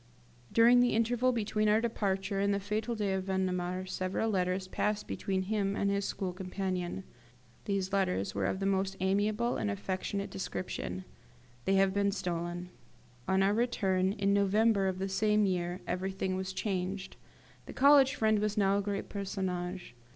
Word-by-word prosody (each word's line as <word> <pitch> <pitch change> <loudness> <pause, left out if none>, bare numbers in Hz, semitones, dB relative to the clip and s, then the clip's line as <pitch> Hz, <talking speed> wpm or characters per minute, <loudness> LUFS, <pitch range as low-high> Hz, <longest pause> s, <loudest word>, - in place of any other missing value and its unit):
During 235 +2 +6
the 245 -2 +3
interval 240 +3 +2
between 215 -2 0
our 215 +1 +4
departure 195 -3 -1
and 200 +1 +2
the 200 - +1
fatal 215 +4 -2
day 205 -3 -1
of 190 -1 -2
Vendemiaire 185 -1 -1
several 185 +4 -1
letters 185 -1 0
passed 210 +2 -1
between 190 -1 -2
him 200 0 -1
and 200 0 +1
his 200 0 0
school 185 -2 -3
companion. 185 0 -3 0.6
These 195 -1 -1
letters 100 - 0
were 100 -2 0
of 190 - -2
the 195 - -2
most 195 0 0
amiable 210 +5 +1
and 210 - -1
affectionate 200 0 -3
description. 95 - -4 0.6
They 195 - +3
have 195 0 +3
been 200 0 +2
stolen. 175 -1 -3 0.6
On 190 0 +3
our 200 +1 +3
return, 195 -5 +1
in 200 -1 +1
November 200 0 +3
of 185 -1 -1
the 190 +1 -2
same 210 +2 +2
year, 180 -1 -1
everything 190 +1 -2
was 190 0 -3
changed. 190 -1 -3 0.5
The - - -7
college 280 0 +6
friend 220 -3 +2
was 210 +1 -1
now 200 -1 +3
a - - 0
great 200 0 -3
personage. 185 - -4
195 Hz, 165 wpm, -31 LUFS, 185-210 Hz, 0.6 s, During